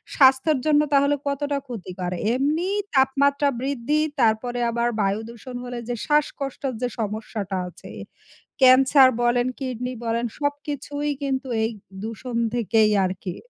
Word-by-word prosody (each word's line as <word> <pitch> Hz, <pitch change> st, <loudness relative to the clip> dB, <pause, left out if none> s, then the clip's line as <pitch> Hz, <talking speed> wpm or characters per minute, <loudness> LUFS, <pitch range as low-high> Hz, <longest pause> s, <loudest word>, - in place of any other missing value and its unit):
স্বাস্থ্যের 270 Hz, +2 st, +5 dB
জন্য 300 Hz, -1 st, +4 dB
তাহলে 280 Hz, +1 st, +4 dB
কতটা 285 Hz, 0 st, -1 dB
ক্ষতিকর। 185 Hz, -6 st, -5 dB, 0.2 s
এমনিই 315 Hz, +10 st, 0 dB, 0.2 s
তাপমাত্রা 280 Hz, +2 st, +3 dB
বৃদ্ধি 275 Hz, +2 st, -1 dB, 0.2 s
তারপরে 240 Hz, +1 st, +1 dB
আবার 235 Hz, +1 st, 0 dB
বায়ু 200 Hz, +1 st, +1 dB
দূষণ 235 Hz, +2 st, -10 dB
হলে 245 Hz, 0 st, -6 dB
যে 245 Hz, -, -1 dB
শ্বাসকষ্টের 280 Hz, -3 st, -1 dB
যে 250 Hz, -, +1 dB
সমস্যাটা 210 Hz, -2 st, -3 dB
আছে। 180 Hz, -, -12 dB, 0.7 s
ক্যান্সার 260 Hz, +1 st, +7 dB
বলেন, 245 Hz, +1 st, +2 dB
কিডনি 250 Hz, -1 st, -3 dB
বলেন 230 Hz, +1 st, 0 dB
সবকিছুই 290 Hz, 0 st, -3 dB
কিন্তু 270 Hz, -1 st, -2 dB, 0.2 s
এই 225 Hz, -, 0 dB, 0.3 s
দূষণ 230 Hz, +2 st, -6 dB, 0.2 s
থেকেই 220 Hz, -2 st, +3 dB
আরকি। 185 Hz, -1 st, -4 dB
255 Hz, 125 wpm, -23 LUFS, 230-280 Hz, 0.7 s, ক্যান্সার